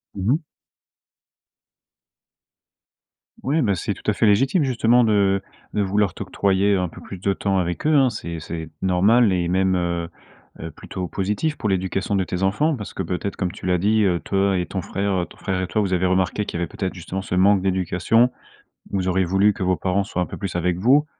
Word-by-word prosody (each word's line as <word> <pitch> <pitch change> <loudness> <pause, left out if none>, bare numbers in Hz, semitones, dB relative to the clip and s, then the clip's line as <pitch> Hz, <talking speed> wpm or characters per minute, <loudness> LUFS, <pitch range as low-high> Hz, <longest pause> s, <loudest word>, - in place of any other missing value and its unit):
Mmh 100 +5 0
mh. 160 +1 -2 3.0
Oui, 150 +5 +1
beh 100 -5 +2
c'est 85 - -2
tout - - -4
à - - +3
fait - - +1
légitime, 135 - +3
justement, 120 -2 +3
de 100 -3 +2 0.3
de 105 - +1
vouloir 100 -1 +1
t'octroyer 100 +1 +1
un 90 -1 0
peu - - -12
plus 95 - -9
de 100 +2 0
temps 95 0 -1
avec 90 - -2
eux, 155 - +3
hein. 135 -3 +5
C'est 85 -7 -6
c'est 80 0 -6
normal 100 +4 +4
et 90 -1 0
même, 95 0 +2
heu 85 -1 -1 0.5
heu, 80 +1 -6
plutôt 90 +4 -6
positif 105 - -2
pour 105 - -2
l'éducation 95 +1 -1
de 95 - +1
tes 90 +1 -4
enfants. 145 +12 +2
Parce 105 - -7
que - - -3
peut-être, 95 +2 -3
comme 90 -2 -2
tu - - -12
l'as 90 -1 +2
dit, 105 +4 +2
heu, 90 -3 +2
toi 95 -1 +1
et 90 - -2
ton 95 -2 -4
frère 95 -2 -1
ton - - -16
frère 95 -2 -2
et - - -1
toi, 110 - 0
vous 95 -2 -1
avez 90 +1 +1
remarqué 95 +3 +1
qu'il 85 - -5
y - - -2
avait - - 0
peut-être 95 -2 -4
justement 95 +2 -5
ce 90 - -4
manque 95 0 +4
d'éducation. 95 +6 +2 0.6
Vous 95 -2 -1
auriez 95 0 +2
voulu 95 +4 +3
que 100 - -7
vos 90 -1 +2
parents 95 +1 0
soient 90 - -2
un - - -2
peu - - -8
plus 95 -4 -4
avec 90 0 0
vous, 135 +9 +4
95 Hz, 210 wpm, -22 LUFS, 90-105 Hz, 3.0 s, hein